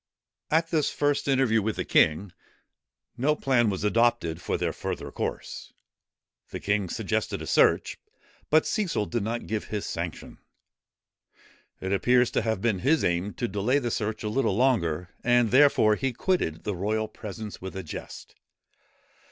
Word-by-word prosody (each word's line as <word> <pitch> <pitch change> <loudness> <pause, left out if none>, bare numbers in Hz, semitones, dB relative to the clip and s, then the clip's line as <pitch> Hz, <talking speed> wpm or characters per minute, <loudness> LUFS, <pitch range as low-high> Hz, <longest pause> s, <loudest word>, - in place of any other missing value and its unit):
At 165 +1 +1
this 155 -4 +2
first 145 -1 0
interview 130 -5 +3
with 110 +1 -2
the - - -3
king, 85 +5 +3 0.9
no 150 +5 +2
plan 125 -6 +2
was 95 -1 -3
adopted 105 -6 +1
for - - -1
their - - -1
further - - -5
course. - - -5 0.8
The - - -6
king 100 -2 0
suggested - - -2
a - - -6
search; - - +2 0.5
but 155 +1 +4
Cecil 190 - -1
did 120 +1 -2
not 115 +3 -3
give 110 -1 -3
his 105 -2 -4
sanction. 85 -1 -6 1.4
It 95 +1 -2
appears 125 +4 +3
to - - +1
have 110 -4 -1
been 110 -5 +1
his 145 - +2
aim 85 +4 -1
to 120 - -2
delay 105 +7 +1
the 120 -4 -1
search 110 0 -3
a 105 - -2
little 115 -4 +1
longer; 90 -10 +1
and, 120 -2 +3
therefore, 130 -5 +5
he 135 +2 -2
quitted 120 - -1
the 105 -3 -2
royal 110 +4 -1
presence 110 0 -8
with 95 0 -7
a 95 - -4
jest. 75 - -9
110 Hz, 160 wpm, -26 LUFS, 100-130 Hz, 1.4 s, therefore